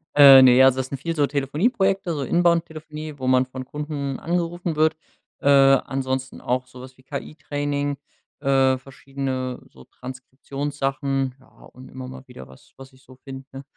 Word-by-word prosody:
Äh, 135 Hz, -2 st, +10 dB
ne, 125 Hz, 0 st, +7 dB
also 130 Hz, -1 st, +5 dB
das 130 Hz, 0 st, -3 dB
sind 140 Hz, -, -4 dB
viel 165 Hz, +4 st, -3 dB
so 145 Hz, -, +3 dB
Telefonieprojekte, 185 Hz, -, 0 dB
so 145 Hz, -, -3 dB
Inbound-Telefonie, 155 Hz, -1 st, -1 dB
wo 130 Hz, -, -6 dB
man 130 Hz, 0 st, +3 dB
von 130 Hz, 0 st, -8 dB
Kunden 145 Hz, -2 st, -5 dB
angerufen 175 Hz, 0 st, -2 dB
wird. 155 Hz, +1 st, +2 dB, 0.5 s
Äh, 140 Hz, -, +2 dB
ansonsten 135 Hz, -1 st, +2 dB
auch 130 Hz, +1 st, -2 dB
so 125 Hz, 0 st, -13 dB
was 130 Hz, 0 st, -13 dB
wie -, -, -18 dB
KI-Training, 145 Hz, 0 st, -4 dB, 0.4 s
äh, 135 Hz, -2 st, +2 dB
verschiedene 135 Hz, -1 st, -5 dB
so 65 Hz, -, -16 dB
Transkriptionssachen. 135 Hz, +1 st, -4 dB
Ja, 130 Hz, -, -22 dB, 0.3 s
und 130 Hz, +1 st, -13 dB
immer 130 Hz, 0 st, -8 dB
mal 130 Hz, 0 st, -10 dB
wieder 95 Hz, -, -12 dB
was, 65 Hz, -, -19 dB
was 135 Hz, 0 st, -13 dB
ich 130 Hz, -, -22 dB
so 130 Hz, -1 st, -16 dB
finde. 135 Hz, +1 st, -10 dB
135 Hz, 160 wpm, -23 LUFS, 130-150 Hz, 0.5 s, Äh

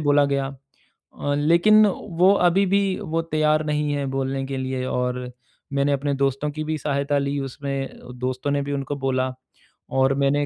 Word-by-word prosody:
बोला 145 Hz, -1 st, +4 dB
गया 140 Hz, -1 st, 0 dB, 0.7 s
अ, 145 Hz, -, -1 dB
लेकिन 170 Hz, +9 st, +5 dB
वो 185 Hz, 0 st, +2 dB, 0.2 s
अभी 195 Hz, +3 st, +2 dB
भी 200 Hz, 0 st, +4 dB, 0.2 s
वो 165 Hz, -4 st, -1 dB
तैयार 155 Hz, 0 st, +2 dB
नहीं 150 Hz, 0 st, 0 dB
हैं 140 Hz, -2 st, -2 dB
बोलने 135 Hz, 0 st, -2 dB
के 135 Hz, 0 st, -4 dB
लिए 130 Hz, -1 st, -2 dB
और 125 Hz, 0 st, -1 dB, 0.5 s
मैंने 140 Hz, +1 st, +2 dB
अपने 140 Hz, +1 st, 0 dB
दोस्तों 140 Hz, +1 st, 0 dB
की 155 Hz, +1 st, -4 dB
भी 155 Hz, 0 st, -2 dB
सहायता 145 Hz, 0 st, 0 dB
ली 140 Hz, 0 st, -1 dB
उसमें। 135 Hz, 0 st, -4 dB, 0.2 s
दोस्तों 130 Hz, +2 st, -2 dB
ने 145 Hz, 0 st, +1 dB
भी 140 Hz, +1 st, -4 dB
उनको 140 Hz, +1 st, -3 dB
बोला 130 Hz, -1 st, -1 dB, 0.6 s
और 130 Hz, +1 st, +4 dB
मैंने 145 Hz, +1 st, +2 dB
140 Hz, 170 wpm, -23 LUFS, 135-150 Hz, 0.7 s, लेकिन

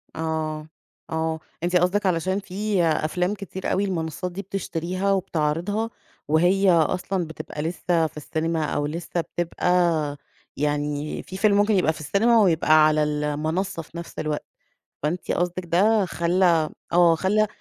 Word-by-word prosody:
آه، 155 Hz, -1 st, -3 dB, 0.4 s
آه، 160 Hz, 0 st, -1 dB, 0.2 s
أنتِ 175 Hz, +1 st, 0 dB
قصدِك 180 Hz, +4 st, +2 dB
علشان 185 Hz, +2 st, +1 dB
في 200 Hz, 0 st, -1 dB
أفلام 170 Hz, +4 st, +1 dB
كتير 195 Hz, -2 st, -5 dB
أوي 195 Hz, -, +1 dB
المنصّات 175 Hz, -1 st, -3 dB
دي 195 Hz, +3 st, -5 dB
بتشتريها 185 Hz, 0 st, -2 dB
وبتعرضها 185 Hz, +4 st, 0 dB, 0.4 s
وهي 180 Hz, +5 st, +4 dB
أصلًا 180 Hz, +3 st, +1 dB
بتبقى 155 Hz, -1 st, -7 dB
لسه 165 Hz, 0 st, 0 dB
في 155 Hz, -, -14 dB
السينما 160 Hz, +1 st, -2 dB
أو 145 Hz, 0 st, -1 dB
لسه 170 Hz, +3 st, -3 dB
بتبقى 170 Hz, -3 st, 0 dB, 0.4 s
يعني 145 Hz, 0 st, -2 dB
في 190 Hz, -, -8 dB
فيلم 205 Hz, 0 st, +3 dB
ممكن 205 Hz, +1 st, +3 dB
يبقى 175 Hz, -4 st, +3 dB
في -, -, -11 dB
السينما 220 Hz, +8 st, +3 dB
ويبقى 155 Hz, -4 st, +5 dB
على 155 Hz, 0 st, +2 dB
المنصّة 150 Hz, +4 st, -1 dB
في 165 Hz, +2 st, -12 dB
نفس 170 Hz, -, -8 dB
الوقت. 150 Hz, -1 st, -2 dB, 0.6 s
فأنتِ 170 Hz, +4 st, -2 dB
قصدِك 175 Hz, +1 st, -1 dB
ده 200 Hz, +5 st, +3 dB
خلّى 170 Hz, -2 st, +2 dB, 0.2 s
م -, -, -1 dB
آه 170 Hz, -2 st, +6 dB
خلّى 210 Hz, +5 st, +2 dB
170 Hz, 145 wpm, -24 LUFS, 155-190 Hz, 0.6 s, آه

